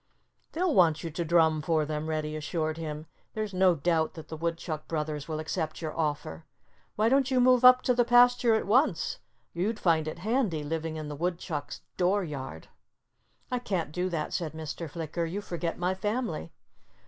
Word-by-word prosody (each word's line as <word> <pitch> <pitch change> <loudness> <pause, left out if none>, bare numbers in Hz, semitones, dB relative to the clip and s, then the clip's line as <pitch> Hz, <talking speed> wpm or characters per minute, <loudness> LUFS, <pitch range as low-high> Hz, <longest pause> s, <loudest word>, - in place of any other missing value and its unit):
"They'll 355 +1 +1
want 165 -6 +4
you 165 - -4
to 170 +3 -2
drum 160 -2 +3
for 155 0 +1
them," 155 +1 -3
Reddy 155 -1 -2
assured 155 0 -2
him. 155 -1 -5 0.3
"There's 215 -2 -3
no 185 -1 +4
doubt 160 +2 0
that 160 - -10
the 160 - -5
Woodchuck 165 -1 -3
brothers 150 -2 -3
will 155 -1 -3
accept 155 0 -3
your 155 -2 -5
offer.... 145 - -2 0.5
Why 215 +1 +2
don't 270 +2 +3
you 260 -1 +2
move 250 0 +5
up 255 0 +8
to 250 - +3
the 245 0 +3
pasture 245 -1 +5
at 220 - 0
once? 250 +9 +2 0.3
You'd 205 +6 -1
find 160 -3 +2
it 155 - -4
handy, 205 - 0
living 160 +1 -3
in 155 -1 -5
the 150 - -5
Woodchucks' 165 -2 -3 0.2
door 190 +3 +2
yard." 135 - -7 0.8
"I 250 - 0
can't 185 -10 -2
do 180 +3 -1
that," 160 -4 -3
said 160 -3 -2
Mr. 160 +1 -6
Flicker. 165 +1 -3
"You 185 +5 -3
forget 170 -4 -4
my 180 +1 0
family." 210 - -3
165 Hz, 185 wpm, -28 LUFS, 155-205 Hz, 0.8 s, up